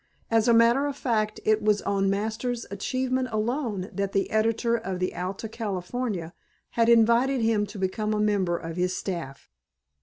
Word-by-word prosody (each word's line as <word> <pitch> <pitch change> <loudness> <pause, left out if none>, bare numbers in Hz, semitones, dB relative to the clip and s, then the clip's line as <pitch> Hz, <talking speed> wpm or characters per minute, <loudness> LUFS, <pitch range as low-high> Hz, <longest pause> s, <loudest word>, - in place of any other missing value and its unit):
As 225 0 +3
a - - +6
matter 235 +5 +4
of 285 -1 -4
fact 215 -5 0
it 215 0 +3
was 210 -1 +2
on 195 -1 +1
Masters' 220 +4 -2
achievement 255 +5 -1
alone 215 -3 -2
that 200 -1 -2
the 195 - 0
editor 225 +2 +1
of 190 -5 -3
the 185 0 -2
Alta 190 +5 -4
California 205 -3 -4 0.4
had 230 0 +2
invited 235 +3 +4
him 220 -2 +2
to 205 +1 -10
become 195 +3 -1
a 215 - 0
member 200 -5 +1
of 165 0 -7
his 180 +1 0
staff. 165 -8 -5
215 Hz, 170 wpm, -26 LUFS, 195-235 Hz, 0.4 s, a